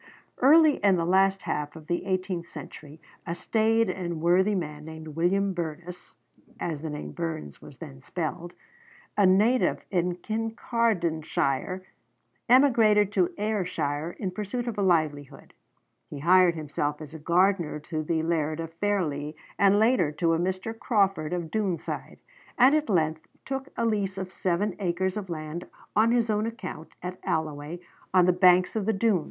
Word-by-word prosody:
Early 305 +3 +6
in 200 -2 +3
the 170 -2 0
last 195 +1 +3
half 150 +1 -3
of 160 -1 -11
the 175 +3 -2
eighteenth 185 -2 -2
century 150 -1 -10 0.3
a 170 - -2
staid 225 +3 +2
and 175 -3 -3
worthy 185 +5 +3
man, 150 -4 -4
named 160 0 -9
William 185 +5 +1
Burness 175 +1 -6 0.5
(as 160 -4 -3
the 160 - -4
name 150 0 -6
Burns 160 - -5
was - - -13
then 70 0 -10
spelled), 175 +1 -4 0.6
a 200 -2 +5
native 215 +7 +3
of 180 -1 -1
Kincardineshire, 190 - -1 0.7
emigrated 225 -6 +5
to 185 -4 +2
Ayrshire 175 -7 -2
in 190 -3 -3
pursuit 215 +5 -4
of 225 -3 -3
a - - +2
livelihood. 155 -6 0 0.6
He 145 - -7
hired 175 +3 +5
himself 150 -1 -3
as 155 0 -10
a 160 - -8
gardener 175 0 +2
to 155 +1 -4
the 160 +1 -1
laird 160 -1 -1
of 165 0 -5
Fairlie, 165 -6 -1 0.2
and 200 0 +5
later 220 - +3
to 165 +1 +1
a 165 - +1
Mr. 185 +5 -2
Crawford 195 -10 +1
of 175 -3 -3
Doonside, 200 -6 -3 0.4
and 255 +2 +6
at 305 -3 +1
length 160 -4 0 0.2
took 270 0 -4
a 230 - +1
lease 200 -4 -1
of 190 -1 -5
seven 190 +2 -1
acres 185 0 -1
of 205 -3 -5
land 155 +1 -5 0.3
on 220 +2 +4
his 235 -2 +2
own 210 +1 0
account 185 -8 -7
at 180 +1 -5
Alloway 155 +1 -3 0.3
on 185 -1 +5
the 180 - +4
banks 180 +1 +4
of 215 -2 -1
the 220 - +3
Doon. 205 -1 +2
180 Hz, 160 wpm, -27 LUFS, 160-205 Hz, 0.7 s, Early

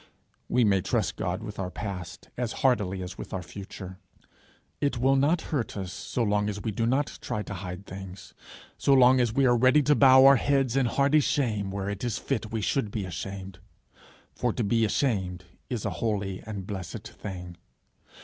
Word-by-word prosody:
We 125 - +3
may 100 -3 +3
trust - - -1
God 90 +4 -3
with 105 -2 -7
our 95 -1 -2
past 90 -3 -7
as 120 -2 -2
heartily 100 -7 +2
as 90 +1 -8
with - - -7
our 95 -1 -3
future. 95 +2 -9 0.8
It 140 -3 0
will 135 +3 +3
not 150 +5 +3
hurt 125 -7 -1
us 95 -2 -5
so 120 - -2
long 105 -1 +1
as 100 -1 -4
we 110 +1 -3
do 115 +3 -1
not 135 +4 0
try 105 - -3
to - - -7
hide 90 0 -6
things, 95 -1 -9 0.5
so 140 - +4
long 130 0 +6
as 120 -3 +2
we 135 +4 +2
are 120 -1 +5
ready 130 +5 +5
to 150 - +4
bow 130 -2 +7
our 135 0 +8
heads 135 -2 +1
in 135 -3 +3
hearty 140 +5 +3
shame 110 -9 0
where 95 0 -4
it 100 +1 -4
is 120 -3 -1
fit 110 -5 -3
we 110 -1 -2
should 110 +2 0
be 100 -1 -3
ashamed. 95 +1 -6 0.7
For - - 0
to 120 - -1
be 115 +2 +2
ashamed 95 -6 -1 0.3
is 120 -5 -3
a 100 - 0
holy 100 0 -2
and 100 -3 -5
blessed 95 -3 -6
thing. 90 -3 -8
105 Hz, 195 wpm, -27 LUFS, 95-130 Hz, 0.8 s, our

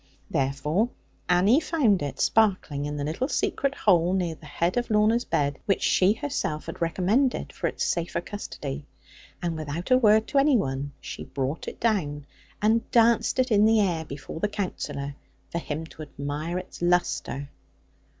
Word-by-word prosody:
Therefore 145 - +1 0.4
Annie 190 +10 +5
found 285 - +2
it 145 -2 -4
sparkling 185 -10 +2
in 145 0 -4
the 145 - -2
little 160 - -1
secret 300 -6 0
hole, 180 -3 +3
near 180 -3 0
the 155 -1 -14
head 170 +5 -1
of 245 -1 -1
Lorna's 220 +2 +3
bed, 145 -1 0
which 195 - +1
she 190 +2 +4
herself 225 - -3
had - - -8
recommended 195 +10 +1
for - - -2
its - - -2
safer 170 0 -1
custody; 150 -7 -6 0.6
and 170 -2 -1
without 155 - -5
a 255 - +7
word 220 -2 +5
to 280 - +3
any 275 -2 +5
one 135 -5 -2
she - - -7
brought 135 +2 -3
it - - -7
down, 150 -11 0 0.4
and 225 +2 +2
danced 230 0 +3
it 255 -1 +1
in 210 -1 +5
the 220 0 +5
air 175 -6 +1
before 150 +1 -8
the 210 - +1
Counsellor, 160 -8 -4 0.4
for 170 - -1
him 155 0 -4
to 160 - -12
admire 150 +3 -4
its 185 -1 -8
lustre. 175 -5 0
180 Hz, 170 wpm, -26 LUFS, 150-220 Hz, 0.6 s, a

